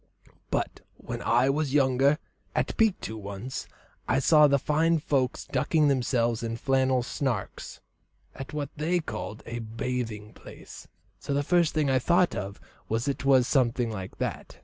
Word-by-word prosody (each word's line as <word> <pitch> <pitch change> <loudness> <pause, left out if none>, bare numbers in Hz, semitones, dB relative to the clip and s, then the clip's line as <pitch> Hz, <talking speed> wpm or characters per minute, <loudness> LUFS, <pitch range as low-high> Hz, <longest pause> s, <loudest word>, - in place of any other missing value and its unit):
But - - -2 0.2
when - - -6
I 125 +3 +3
was 145 -1 -1
younger, 135 +1 +4 0.4
at - - 0
Pictou 205 - +1
once, 100 +5 -6 0.4
I 125 - +2
saw 150 +2 +6
the 140 0 +3
fine 160 +4 +2
folks 140 -4 -1
ducking 150 +3 +2
themselves 120 -3 +1
in 115 0 -3
flannel 130 0 +2
sarks, 120 -5 -4 0.5
at 135 - -8
what 145 -3 -3
they 165 +4 +1
called 110 -8 -6
a 120 +1 -5
'bathing 115 -1 -4
place,' - - -12 0.3
so 140 - -3
the 145 - +1
first 170 0 +2
thing 155 -2 +2
I 130 - +3
thought 175 +7 +3
of 100 0 -5 0.3
was 115 +2 0
that 140 -1 -1
it - - -7
was 130 -3 +5
something 125 -4 +1
like 95 -3 -7
that. - - -4
130 Hz, 160 wpm, -27 LUFS, 115-150 Hz, 0.5 s, saw